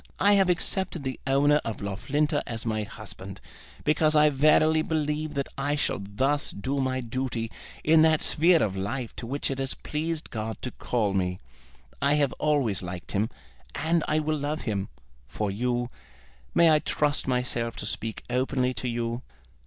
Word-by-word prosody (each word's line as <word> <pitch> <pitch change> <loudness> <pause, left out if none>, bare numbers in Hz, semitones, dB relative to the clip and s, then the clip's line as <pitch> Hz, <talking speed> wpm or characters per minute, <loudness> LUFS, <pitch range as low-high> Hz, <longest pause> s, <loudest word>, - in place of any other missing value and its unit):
I 205 +1 +5
have 195 -2 +4
accepted 180 -2 0
the 130 -1 -4
owner 145 +2 +4
of 115 -3 -4
Loughlinter 145 - 0
as 115 -1 -4
my 110 -1 0
husband, 100 -2 -8 0.4
because 155 +1 +3
I 150 0 +6
verily 155 +3 +4
believe 155 -1 -1
that 140 -1 -1
I 145 +2 +1
shall 145 - -1
thus 135 +9 0
do 135 +8 -3
my 130 0 0
duty 120 -1 -3 0.3
in 160 0 +6
that 160 -1 +4
sphere 165 +2 +5
of 100 -3 -1
life 115 +6 -3
to 115 - -5
which 140 +2 -2
it 135 - -3
has 135 0 -2
pleased 160 +1 -4
God 110 -1 -4
to 125 - -2
call 110 -5 -1
me. 90 -1 0 0.6
I 140 +1 +4
have 145 -3 +2
always 140 -10 +2
liked 90 -1 -6
him, 105 +3 +1 0.5
and 165 +1 +1
I 155 - +2
will 155 0 0
love 145 +2 -2
him. 100 -3 -2 0.4
For 100 - -2
you, 120 +3 -1 0.6
may 170 -1 +6
I 155 - +5
trust 150 -2 0
myself 125 -2 0
to - - -5
speak 110 +1 -4
openly 130 +1 0
to 125 - -4
you?" 120 0 -2
135 Hz, 170 wpm, -27 LUFS, 115-150 Hz, 0.6 s, I